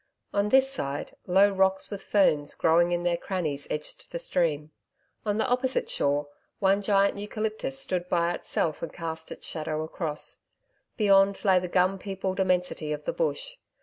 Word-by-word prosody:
On 205 Hz, +1 st, +1 dB
this 265 Hz, +3 st, +5 dB
side, 145 Hz, -, -4 dB
low 195 Hz, +3 st, +5 dB
rocks 190 Hz, 0 st, +1 dB
with 200 Hz, -1 st, -5 dB
ferns 155 Hz, -9 st, +2 dB
growing 170 Hz, +2 st, +3 dB
in 175 Hz, 0 st, 0 dB
their 175 Hz, -1 st, +1 dB
crannies, 160 Hz, -7 st, -3 dB
edged 150 Hz, 0 st, -4 dB
the -, -, -4 dB
stream. 155 Hz, -, -1 dB, 0.6 s
On 205 Hz, 0 st, +1 dB
the 220 Hz, -, +1 dB
opposite 255 Hz, +1 st, 0 dB
shore, 145 Hz, +1 st, +1 dB, 0.3 s
one 195 Hz, +1 st, +3 dB
giant 200 Hz, 0 st, +2 dB
eucalyptus 215 Hz, -, -3 dB
stood 175 Hz, +6 st, -2 dB
by 170 Hz, 0 st, +2 dB
itself 160 Hz, -2 st, -2 dB
and 165 Hz, -, -4 dB
cast 160 Hz, -1 st, -6 dB
its -, -, -9 dB
shadow 155 Hz, -1 st, -3 dB
across. 160 Hz, -1 st, -4 dB, 0.6 s
Beyond, 200 Hz, -1 st, +4 dB
lay 190 Hz, -2 st, +5 dB
the 180 Hz, -, -4 dB
gum 185 Hz, +2 st, +2 dB
peopled 195 Hz, -1 st, -3 dB
immensity 180 Hz, -4 st, 0 dB
of 150 Hz, 0 st, -3 dB
the -, -, -2 dB
bush. -, -, -2 dB
185 Hz, 165 wpm, -27 LUFS, 160-200 Hz, 0.6 s, this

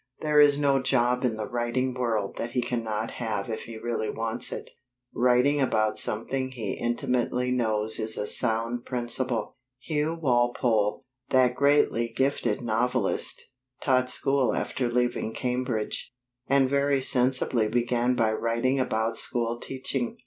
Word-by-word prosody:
There 150 Hz, -1 st, +3 dB
is 145 Hz, -1 st, +6 dB
no 140 Hz, -2 st, +2 dB
job 125 Hz, -1 st, +1 dB
in 120 Hz, -3 st, +1 dB
the 110 Hz, -, -4 dB
writing 125 Hz, +1 st, -1 dB
world 115 Hz, -5 st, -2 dB
that 120 Hz, +1 st, -4 dB
he 125 Hz, -, +1 dB
cannot 115 Hz, -2 st, -3 dB
have 105 Hz, -2 st, -3 dB
if 110 Hz, -, -5 dB
he 115 Hz, -1 st, -8 dB
really 115 Hz, -1 st, -3 dB
wants 115 Hz, +2 st, -2 dB
it. -, -, -7 dB, 0.4 s
Writing 125 Hz, +4 st, +3 dB
about 110 Hz, -4 st, +1 dB
something 130 Hz, +5 st, 0 dB
he 115 Hz, -6 st, -5 dB
intimately 125 Hz, +1 st, -1 dB
knows 110 Hz, -3 st, 0 dB
is 110 Hz, 0 st, +1 dB
a 105 Hz, -, -2 dB
sound 115 Hz, +2 st, +3 dB
principle. 120 Hz, -2 st, -2 dB, 0.2 s
Hugh 155 Hz, +4 st, -2 dB
Walpole, 120 Hz, -6 st, +1 dB, 0.2 s
that 130 Hz, -1 st, +3 dB
greatly 140 Hz, -4 st, +2 dB
gifted 135 Hz, 0 st, 0 dB
novelist, 120 Hz, -1 st, 0 dB, 0.4 s
taught 130 Hz, -2 st, +1 dB
school 135 Hz, 0 st, +1 dB
after 125 Hz, -2 st, -2 dB
leaving 120 Hz, -2 st, -1 dB
Cambridge, 125 Hz, -3 st, -2 dB, 0.4 s
and 135 Hz, -1 st, +3 dB
very 140 Hz, 0 st, +1 dB
sensibly 125 Hz, -3 st, +1 dB
began 120 Hz, +2 st, 0 dB
by 110 Hz, -2 st, +1 dB
writing 115 Hz, +4 st, 0 dB
about 115 Hz, -2 st, -1 dB
school 120 Hz, -1 st, -1 dB
teaching. 130 Hz, -2 st, -4 dB
120 Hz, 140 wpm, -26 LUFS, 115-130 Hz, 0.4 s, is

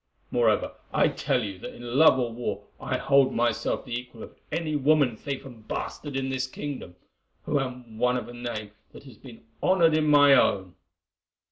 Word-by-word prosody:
Moreover, -, -, +2 dB, 0.2 s
I -, -, +3 dB
tell -, -, 0 dB
you 100 Hz, -3 st, -6 dB
that -, -, -8 dB
in 120 Hz, +3 st, -3 dB
love 160 Hz, -4 st, +7 dB
or 120 Hz, -2 st, -1 dB
war 120 Hz, +1 st, -4 dB, 0.2 s
I -, -, -2 dB
hold 140 Hz, -1 st, +3 dB
myself 120 Hz, -1 st, 0 dB
the 125 Hz, -, -7 dB
equal 120 Hz, -2 st, -6 dB
of -, -, -12 dB, 0.2 s
any 160 Hz, -2 st, -2 dB
woman 145 Hz, -4 st, +3 dB
thief 140 Hz, +4 st, -5 dB
and 115 Hz, -5 st, -13 dB
bastard 145 Hz, -2 st, -5 dB
in 135 Hz, 0 st, -1 dB
this 130 Hz, 0 st, -1 dB
kingdom, 130 Hz, -10 st, -7 dB, 0.5 s
who 145 Hz, -, 0 dB
am 125 Hz, -4 st, -6 dB
one 125 Hz, +1 st, +2 dB
of 125 Hz, -, -5 dB
a 120 Hz, -, -10 dB
name 120 Hz, -4 st, -5 dB, 0.2 s
that -, -, -12 dB
has 130 Hz, -6 st, -14 dB
been 120 Hz, -4 st, -14 dB, 0.2 s
honoured 170 Hz, -4 st, +4 dB
in 155 Hz, -1 st, +2 dB
my 145 Hz, -1 st, +7 dB
own." 95 Hz, -8 st, +3 dB
125 Hz, 190 wpm, -26 LUFS, 120-145 Hz, 0.5 s, love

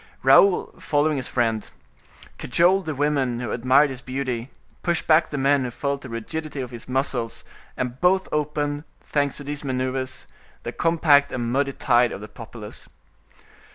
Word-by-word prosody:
Raoul, 175 Hz, +8 st, +5 dB
following 150 Hz, 0 st, +1 dB
his 130 Hz, -, -3 dB
friend, 115 Hz, -3 st, -1 dB, 0.7 s
cajoled 175 Hz, +6 st, +2 dB
the 155 Hz, -, -2 dB
women 135 Hz, -4 st, 0 dB
who 120 Hz, -, -4 dB
admired 130 Hz, +4 st, +4 dB
his 130 Hz, -1 st, -7 dB
beauty, 130 Hz, -2 st, -3 dB, 0.3 s
pushed 170 Hz, -2 st, 0 dB
back 160 Hz, +1 st, +4 dB
the 145 Hz, -, -4 dB
men 140 Hz, 0 st, +3 dB
who 125 Hz, -, -2 dB
felt 140 Hz, +3 st, -3 dB
the 130 Hz, -, -9 dB
rigidity 145 Hz, +6 st, -5 dB
of 125 Hz, -2 st, -5 dB
his 120 Hz, +1 st, -9 dB
muscles, 125 Hz, -3 st, -1 dB, 0.3 s
and 125 Hz, 0 st, -4 dB
both 190 Hz, +1 st, +3 dB
opened, 150 Hz, -1 st, -1 dB, 0.2 s
thanks 145 Hz, -2 st, -1 dB
to 145 Hz, -, -8 dB
these 145 Hz, +1 st, -5 dB
maneuvers, 130 Hz, -1 st, -3 dB, 0.4 s
the -, -, -4 dB
compact 155 Hz, -4 st, +3 dB
and 120 Hz, -1 st, -2 dB
muddy 140 Hz, +1 st, +1 dB
tide 120 Hz, -2 st, +3 dB
of -, -, -6 dB
the 105 Hz, -, -8 dB
populace. 110 Hz, 0 st, -10 dB
135 Hz, 160 wpm, -24 LUFS, 125-150 Hz, 0.7 s, Raoul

